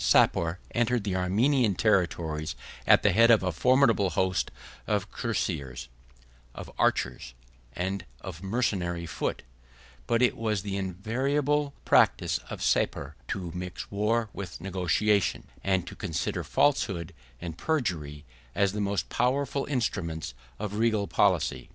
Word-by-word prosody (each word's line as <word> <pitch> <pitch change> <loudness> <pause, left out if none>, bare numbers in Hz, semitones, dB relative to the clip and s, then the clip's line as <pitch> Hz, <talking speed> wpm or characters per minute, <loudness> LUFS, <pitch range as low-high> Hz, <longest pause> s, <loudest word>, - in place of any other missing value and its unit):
133 - - +5
Sapor 85 +2 -3
entered 120 -1 +1
the 95 -2 -1
Armenian 105 +5 +2
territories 85 - 0 0.3
at - - +6
the - - +5
head 115 +1 +5
of 115 -4 +6
a 90 - 0
formidable 115 - +3
host 90 +1 0 0.4
of 105 -1 -1
cuirassiers, 80 - -3 0.7
of - - -8
archers, 65 0 0 0.4
and 95 +4 -2 0.2
of 85 -3 -8
mercenary 95 -5 -1
foot; 80 - -3 0.6
but 115 +1 +2
it 125 - +3
was 110 -4 -1
the 100 -1 -3
invariable 135 +10 0
practice - - +3
of - - -5
Sapor 70 +2 0
to 90 -3 -4
mix 90 0 -6
war 105 +2 0
and 100 -2 -6
negotiation, 95 +2 +1 0.2
and 95 -2 +1
to - - -9
consider 90 -7 -2
falsehood 95 - +1 0.3
and 85 -2 -6
perjury 80 - -2 0.3
as 100 -1 +2
the 105 - -2
most 100 0 -1
powerful 135 +2 0
instruments 95 - -2 0.2
of 105 0 -4
regal 110 -3 +2
policy. - - +1
100 Hz, 130 wpm, -28 LUFS, 90-115 Hz, 0.7 s, at